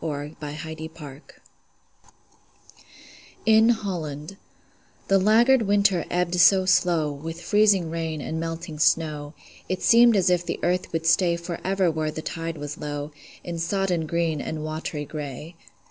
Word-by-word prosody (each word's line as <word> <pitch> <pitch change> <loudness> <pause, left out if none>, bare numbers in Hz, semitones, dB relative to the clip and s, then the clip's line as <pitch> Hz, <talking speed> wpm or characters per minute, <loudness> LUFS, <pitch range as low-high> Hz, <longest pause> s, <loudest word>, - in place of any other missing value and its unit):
FLOOD 150 -1 -5
TIDE 155 +2 -7
OF 160 0 -6
FLOWERS 145 -3 -10 2.2
IN 220 +1 +5
HOLLAND 175 -7 -3 0.7
The 195 0 +5
laggard 230 +6 +4
winter 200 -4 +2
ebbed 180 0 -1
so 190 +2 +6
slow 170 -5 +2
With 160 +4 -7
freezing 195 -2 +2
rain 165 -2 -3
and 160 +3 -4
melting 165 -1 -5
snow, 150 -2 +1 0.3
It 185 - -3
seemed 235 0 +6
as 185 -1 +3
if 175 -1 +2
the 175 - -4
earth 180 +1 0
would 165 0 -3
stay 170 +1 +3
Forever 175 +2 -1
where 155 -1 -2
the 155 +1 -6
tide 165 -1 -5
was 145 +1 -7
low, 145 0 -5 0.3
In 170 -1 -5
sodden 175 -1 -1
green 165 -2 -1
and 155 -1 -5
watery 155 -1 -4
gray. 150 +2 -7
165 Hz, 145 wpm, -24 LUFS, 155-185 Hz, 2.2 s, so